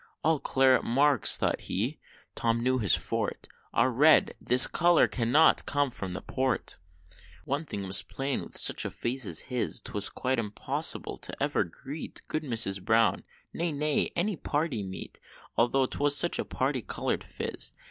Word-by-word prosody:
"All 160 Hz, -2 st, +2 dB
claret 130 Hz, -1 st, +3 dB
marks," 135 Hz, +1 st, +3 dB
thought -, -, -1 dB
he -, -, -2 dB, 0.3 s
Tom 115 Hz, 0 st, 0 dB
knew 130 Hz, +2 st, +1 dB
his 100 Hz, -6 st, +3 dB
forte -, -, -3 dB, 0.2 s
"Are 130 Hz, -, +2 dB
red 150 Hz, +6 st, +4 dB
this 125 Hz, +1 st, +7 dB
color 175 Hz, 0 st, +3 dB
CANNOT 125 Hz, +7 st, +3 dB
come 145 Hz, -1 st, 0 dB
from 95 Hz, -5 st, -6 dB
Port!" 130 Hz, -7 st, -2 dB, 0.7 s
One 145 Hz, +4 st, -2 dB
thing 100 Hz, -8 st, -5 dB
was 95 Hz, 0 st, +3 dB
plain; 135 Hz, 0 st, -3 dB
with -, -, -3 dB
such -, -, +3 dB
a -, -, -3 dB
face 125 Hz, -1 st, -2 dB
as 80 Hz, -, 0 dB
his, 125 Hz, -1 st, -2 dB
'Twas 105 Hz, -2 st, 0 dB
quite 130 Hz, -1 st, -2 dB
impossible 105 Hz, -2 st, -1 dB
to -, -, -2 dB
ever -, -, +1 dB
greet 135 Hz, -, -5 dB
Good 155 Hz, -, -2 dB
Mrs. 115 Hz, -9 st, -1 dB
Brown; 115 Hz, +2 st, +2 dB, 0.3 s
nay, 150 Hz, -3 st, -1 dB
any 195 Hz, +4 st, 0 dB
party 145 Hz, -7 st, -2 dB
meet, 95 Hz, -1 st, -8 dB, 0.4 s
Altho' 125 Hz, +3 st, +2 dB
'twas 145 Hz, +2 st, 0 dB
such 175 Hz, -, +1 dB
a -, -, -2 dB
parti 130 Hz, -1 st, -2 dB
colored -, -, -3 dB
phiz! -, -, -3 dB
130 Hz, 155 wpm, -28 LUFS, 115-145 Hz, 0.7 s, this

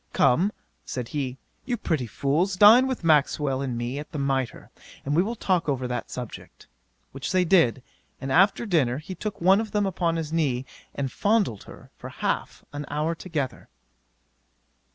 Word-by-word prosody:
"Come, 180 Hz, +11 st, +3 dB, 0.3 s
(said 125 Hz, -3 st, -5 dB
he,) 135 Hz, -3 st, -3 dB, 0.3 s
you 245 Hz, -1 st, -2 dB
pretty 150 Hz, -, -1 dB
fools, 155 Hz, -, 0 dB
dine 220 Hz, +7 st, +8 dB
with 260 Hz, -7 st, -3 dB
Maxwell 150 Hz, -3 st, +2 dB
and 130 Hz, -4 st, -3 dB
me 120 Hz, +4 st, -3 dB
at 150 Hz, -, -9 dB
the -, -, -5 dB
Mitre, 135 Hz, -3 st, -2 dB, 0.3 s
and 145 Hz, +2 st, 0 dB
we 170 Hz, -, +5 dB
will 225 Hz, +5 st, -2 dB
talk 180 Hz, -7 st, 0 dB
over 130 Hz, -2 st, -1 dB
that 125 Hz, 0 st, -4 dB
subject;" 125 Hz, -3 st, -8 dB, 0.5 s
which 135 Hz, +4 st, -5 dB
they 185 Hz, -1 st, +3 dB
did, 145 Hz, -9 st, +3 dB, 0.4 s
and 135 Hz, -1 st, -4 dB
after 190 Hz, -, +4 dB
dinner 145 Hz, -, +1 dB
he 155 Hz, +5 st, -7 dB
took 210 Hz, +3 st, -5 dB
one 190 Hz, +4 st, +5 dB
of 220 Hz, -, -7 dB
them 205 Hz, -1 st, +2 dB
upon 175 Hz, -3 st, 0 dB
his 160 Hz, -1 st, -4 dB
knee, 135 Hz, -6 st, 0 dB, 0.3 s
and 135 Hz, -2 st, -2 dB
fondled 205 Hz, -, +1 dB
her -, -, -14 dB
for -, -, -7 dB
half -, -, -3 dB
an 145 Hz, 0 st, -5 dB
hour 150 Hz, +3 st, -1 dB
together. 160 Hz, -5 st, -4 dB
155 Hz, 175 wpm, -25 LUFS, 135-190 Hz, 0.5 s, dine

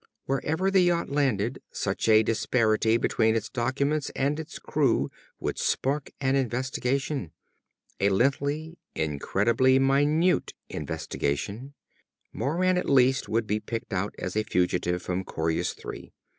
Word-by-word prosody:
Wherever 160 Hz, +8 st, 0 dB
the 190 Hz, -1 st, +5 dB
yacht 175 Hz, -4 st, +1 dB
landed, 130 Hz, -4 st, 0 dB
such 100 Hz, +3 st, -2 dB
a 110 Hz, 0 st, +7 dB
disparity 110 Hz, 0 st, +2 dB
between 110 Hz, -1 st, +2 dB
its 110 Hz, -1 st, -2 dB
documents 140 Hz, +5 st, 0 dB
and 145 Hz, +3 st, 0 dB
its 160 Hz, -, -7 dB
crew -, -, +1 dB, 0.3 s
would -, -, -3 dB
spark 140 Hz, +2 st, 0 dB
an 135 Hz, -1 st, +1 dB
investigation. 130 Hz, -, -1 dB, 0.7 s
A 100 Hz, -, +3 dB
lengthy, 140 Hz, -, 0 dB, 0.2 s
incredibly 105 Hz, -, +2 dB
minute 145 Hz, +6 st, +2 dB
investigation. 80 Hz, -, -3 dB, 0.6 s
Moran, 180 Hz, +9 st, +1 dB
at -, -, -3 dB
least, 130 Hz, -1 st, +3 dB
would 115 Hz, +1 st, +1 dB
be 105 Hz, 0 st, 0 dB
picked 115 Hz, 0 st, -5 dB
out 95 Hz, +2 st, -2 dB
as 95 Hz, -, -4 dB
a 110 Hz, -, +3 dB
fugitive 90 Hz, -3 st, 0 dB
from 90 Hz, +1 st, -2 dB
Coryus 80 Hz, -2 st, -1 dB
Three. -, -, -9 dB
125 Hz, 130 wpm, -27 LUFS, 105-140 Hz, 0.7 s, a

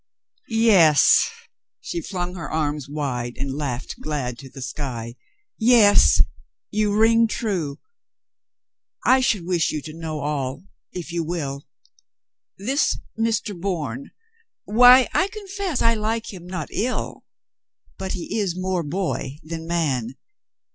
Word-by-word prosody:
"Yes!" 210 Hz, -, +5 dB, 0.5 s
She 345 Hz, -, -4 dB
flung 180 Hz, -, -4 dB
her 165 Hz, -6 st, -6 dB
arms 150 Hz, -3 st, -2 dB
wide 125 Hz, -5 st, -3 dB
and 135 Hz, 0 st, -3 dB
laughed 135 Hz, -3 st, -4 dB
glad 135 Hz, -6 st, -3 dB
to 135 Hz, -, -10 dB
the 135 Hz, -, -11 dB
sky. 120 Hz, -2 st, -5 dB, 0.5 s
"Yes, 220 Hz, -, +6 dB, 0.5 s
you 210 Hz, -1 st, +1 dB
ring 230 Hz, +1 st, +5 dB
true. 190 Hz, -9 st, -2 dB, 1.3 s
I 260 Hz, +1 st, +6 dB
should 210 Hz, -8 st, +1 dB
wish 175 Hz, -2 st, +1 dB
you 155 Hz, -, -2 dB
to 155 Hz, -, -8 dB
know 160 Hz, -2 st, -5 dB
all, 140 Hz, 0 st, -3 dB, 0.3 s
if 175 Hz, -1 st, -6 dB
you 170 Hz, -1 st, -1 dB
will. 145 Hz, -4 st, -4 dB, 0.9 s
This 260 Hz, +10 st, +1 dB, 0.2 s
Mr. 225 Hz, -2 st, -1 dB
Bourne, 160 Hz, -, -4 dB, 0.6 s
why, 245 Hz, +4 st, +7 dB
I 375 Hz, -, +3 dB
profess 395 Hz, -, -3 dB
I 230 Hz, -, +5 dB
like 225 Hz, +1 st, -2 dB
him 180 Hz, -2 st, -10 dB
not 185 Hz, 0 st, -5 dB
ill, 250 Hz, +4 st, -2 dB, 0.8 s
but 190 Hz, 0 st, -3 dB
he 185 Hz, +4 st, -3 dB
is 185 Hz, -4 st, -1 dB
more 185 Hz, -1 st, -1 dB
boy 150 Hz, -4 st, -3 dB
than 165 Hz, 0 st, -6 dB
man. 135 Hz, -8 st, -1 dB
175 Hz, 125 wpm, -23 LUFS, 145-220 Hz, 1.3 s, why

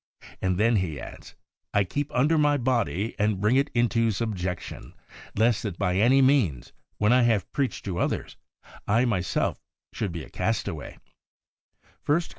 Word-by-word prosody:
And 95 Hz, -1 st, 0 dB
then 115 Hz, +2 st, +3 dB
he 80 Hz, -7 st, -2 dB
adds, -, -, -10 dB, 0.2 s
' -, -, -60 dB
I 100 Hz, -, +4 dB
keep 145 Hz, +10 st, -3 dB
under 145 Hz, +6 st, +2 dB
my 150 Hz, -1 st, +3 dB
body, 120 Hz, -4 st, 0 dB
and 105 Hz, -2 st, +1 dB
bring 105 Hz, +5 st, +2 dB
it 140 Hz, +2 st, +2 dB
into 115 Hz, -1 st, +2 dB
subjection; 95 Hz, -5 st, -4 dB, 0.4 s
lest 115 Hz, +1 st, +2 dB
that 100 Hz, -6 st, -4 dB
by 90 Hz, +1 st, 0 dB
any 130 Hz, +6 st, +5 dB
means, 120 Hz, -, +2 dB, 0.2 s
when 105 Hz, +3 st, +3 dB
I 125 Hz, -, +5 dB
have 115 Hz, -5 st, +1 dB
preached 135 Hz, -3 st, -2 dB
to 90 Hz, -3 st, -3 dB
others, -, -, -2 dB, 0.5 s
I 115 Hz, +4 st, +3 dB
myself 95 Hz, -7 st, -1 dB, 0.3 s
should 105 Hz, -5 st, -3 dB
be 85 Hz, -2 st, -6 dB
a -, -, -12 dB
castaway' -, -, -3 dB
(i -, -, -37 dB, 0.2 s
Cor. 150 Hz, +4 st, +2 dB
110 Hz, 165 wpm, -26 LUFS, 95-125 Hz, 0.5 s, any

